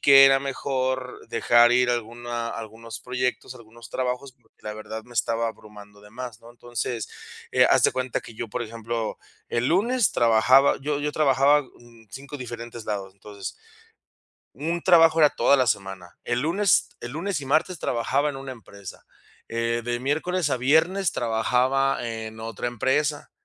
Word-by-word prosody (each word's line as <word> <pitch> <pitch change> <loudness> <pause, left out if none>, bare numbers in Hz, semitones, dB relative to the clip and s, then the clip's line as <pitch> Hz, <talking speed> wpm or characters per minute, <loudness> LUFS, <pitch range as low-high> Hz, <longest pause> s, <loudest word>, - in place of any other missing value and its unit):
que 135 -1 +8
era 135 0 +6
mejor 130 -1 -2
dejar 120 0 +4
ir 125 0 +3
a - - +3
alguna 120 0 -4
algunos 115 0 -8
proyectos, 125 0 -3
algunos 115 -1 -14
trabajos, 130 +1 -3
porque, 120 -2 -34
la 105 - -5
verdad, 110 +1 -7
me 125 - -16
estaba 115 +1 0
abrumando 105 -2 -12
de 105 - -15
más, 120 -1 -8
¿no? 115 - -14
Entonces, 120 -2 -4 0.4
eh, - - +5
haz - - +4
de - - +5
cuenta 130 -1 -2
que 115 - -12
yo, 115 0 -5
por 110 - -3
ejemplo, 115 0 -4 0.3
el 120 +2 0
lunes 225 +6 +2
trabajaba 120 +4 +5
yo 145 +1 -1
yo 150 0 -2
trabajaba, 145 0 +4
mm, 120 -3 -19
5 140 +4 -8
diferentes 120 -2 -8
lados, 100 -2 -4
entonces 100 0 -8 1.0
un 165 +6 -2
trabajo 165 -3 +6
era 150 - +7
toda 140 - +3
la 130 - +2
semana. 95 -4 -3
El 120 +1 0
lunes 180 +6 +2
el 120 - -7
lunes 170 0 -2
y 135 - -8
martes 160 +5 +1
trabajaba 135 +4 0
en 140 - -8
una 135 0 -7
empresa, 100 -5 -12 0.4
eh, 115 0 -1
de 120 0 -2
miércoles 155 +4 0
a 130 - +1
viernes 160 +9 +2
trabajaba 125 +4 +1
en 110 -1 -6
otra 115 +2 -5
empresa, 145 +5 0
120 Hz, 165 wpm, -25 LUFS, 115-140 Hz, 1.0 s, que